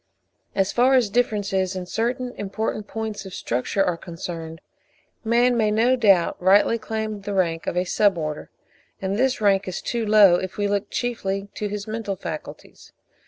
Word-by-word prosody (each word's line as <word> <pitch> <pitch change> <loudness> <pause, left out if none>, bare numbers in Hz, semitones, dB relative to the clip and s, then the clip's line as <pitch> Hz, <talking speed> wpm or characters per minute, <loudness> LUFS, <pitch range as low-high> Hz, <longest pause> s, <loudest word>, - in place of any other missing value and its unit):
As 195 0 +1
far 255 +2 +4
as 235 -6 +2
differences 200 -5 0
in 185 -1 -4
certain 245 +6 -2
important 210 +1 -3
points 220 -2 -5
of 190 -2 -9
structure 125 +11 -1
are 180 -3 0
concerned, 165 -2 -7 0.6
man 240 +2 +3
may 220 -2 +2
no 230 +4 +3
doubt 195 -10 +3
rightly 200 +5 +4
claim 215 -1 -4
the 200 0 -4
rank 165 -3 0
of - - -2
a 180 - +2
Sub 195 +1 +2
order; 155 -2 -4 0.5
and 190 +1 -2
this 260 +4 +1
rank 200 -2 +2
is 185 - -3
too 235 -1 -2
low, 210 -4 +6
if 185 0 -5
we 205 0 0
look 200 0 -1
chiefly 200 -5 -3
to 210 - -3
his 205 0 -5
mental 220 -2 -4
faculties. 160 -4 -9
205 Hz, 170 wpm, -23 LUFS, 185-225 Hz, 0.6 s, low